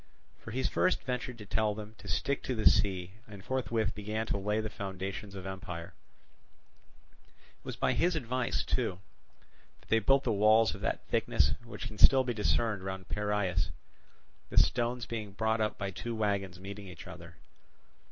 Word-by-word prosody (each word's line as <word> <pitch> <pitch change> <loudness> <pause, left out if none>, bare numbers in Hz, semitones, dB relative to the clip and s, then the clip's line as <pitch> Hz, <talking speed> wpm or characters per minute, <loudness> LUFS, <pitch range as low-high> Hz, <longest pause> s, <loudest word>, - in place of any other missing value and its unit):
For - - -10
he 130 +4 -2
first 185 +7 +2
ventured 125 -1 -3
to 105 - -9
tell 105 +1 +1
them 105 0 -8
to 100 - -11
stick 135 +9 0
to 130 - -2
the 110 - +5
sea 95 -3 +3 0.2
and 100 -2 -11
forthwith 115 -5 0
began 105 +1 -3
to 105 - -1
lay 105 +2 0
the 110 - -1
foundations 100 0 -5
of 95 - -6
the 95 - -3
empire. 90 -3 -7 1.3
It - - -29
was - - -4
by - - +2
his 175 0 +2
advice, 125 -3 0
too, 115 -8 -1 0.8
that - - -24
they 115 - +5
built 135 +6 +4
the - - +1
walls 110 +2 +5
of - - -9
that - - -1
thickness - - +3
which 120 - -7
can 110 -2 -8
still 130 0 +8
be 125 -1 -1
discerned 110 -1 +1
round 95 -1 -5
Piraeus, 100 -5 0 0.8
the - - -7
stones 120 0 +3
being 110 -4 -5
brought 110 +2 +1
up 105 0 0
by 100 -2 -3
two 115 +5 -4
wagons 100 -4 -1
meeting 100 +1 -7
each 90 - -10
other. 85 -3 -10
105 Hz, 180 wpm, -31 LUFS, 95-115 Hz, 1.3 s, still